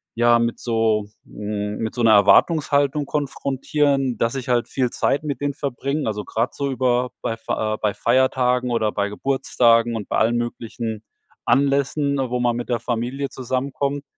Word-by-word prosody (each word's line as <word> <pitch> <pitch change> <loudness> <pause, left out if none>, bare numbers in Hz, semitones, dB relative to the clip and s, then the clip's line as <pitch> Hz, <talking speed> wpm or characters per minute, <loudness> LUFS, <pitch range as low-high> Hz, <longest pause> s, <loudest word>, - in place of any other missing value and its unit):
ja, 120 0 +4
mit 115 0 -1
so 110 -3 0 0.2
hm, 105 0 -4
mit 110 -1 -3
so 120 - -3
'ner 115 - +6
Erwartungshaltung 145 - +4
konfrontieren, 140 -2 -1
dass 115 +4 0
ich 130 -2 -5
halt 120 -1 +1
viel 130 -2 0
Zeit 140 +3 0
mit 145 -2 -4
denen 145 0 -1
verbringe. 140 0 -3
Also 105 -1 -2
grade 115 +3 -1
so 140 -1 -2
über 125 -1 +1
bei 115 - -2
Fa 110 -1 -2
äh, - - -10
bei 105 -2 +1
Feiertagen 125 +1 +1
oder 110 -2 +1
bei 100 0 -1
Geburtstagen 115 -1 +2
und 105 -3 -5
bei - - 0
allen 115 +2 +2
möglichen 115 -2 -4 0.4
Anlässen, 140 +1 +2
ne, 135 -2 -1
wo 125 +1 -1
man 120 -1 +1
mit 120 +1 -5
der 120 - 0
Familie 125 +4 -3
zusammenkommt. 140 +2 -3
125 Hz, 175 wpm, -22 LUFS, 115-140 Hz, 0.4 s, ner